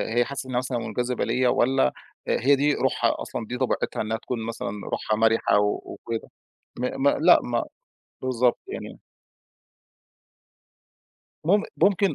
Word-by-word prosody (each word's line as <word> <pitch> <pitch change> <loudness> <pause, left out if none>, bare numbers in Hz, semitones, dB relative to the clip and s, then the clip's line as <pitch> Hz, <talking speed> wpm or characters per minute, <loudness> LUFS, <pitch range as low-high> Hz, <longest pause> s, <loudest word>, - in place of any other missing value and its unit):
هي 120 0 +4
حاسّة 135 -1 -5
إنّها 125 - -1
مثلًا 125 0 -1
مُنجذِبة 125 +1 -2
ليّا 125 -1 +2
والّا 120 - +2 0.3
آآ - - +2
هي 140 +4 +5
دي 145 +2 +2
روحها - - +1
أصلًا، 115 - -5
دي 125 +3 -5
طبيعتها 130 0 -1
إنّها 110 +1 -1
تكون 115 -1 -4
مثلًا 115 -3 -4 0.2
روحها 110 - -1
مَرِحة 115 -1 +3
و 105 0 +1
وكده. 115 -1 -6 0.5
م 125 - 0 0.2
م - - +5
لأ - - +5
ما - - -1 0.6
بالضبط. 125 -1 +1
يعني - - -7 2.4
مم 200 +6 +4
ممكن 195 +2 +3
125 Hz, 145 wpm, -25 LUFS, 115-135 Hz, 2.4 s, هي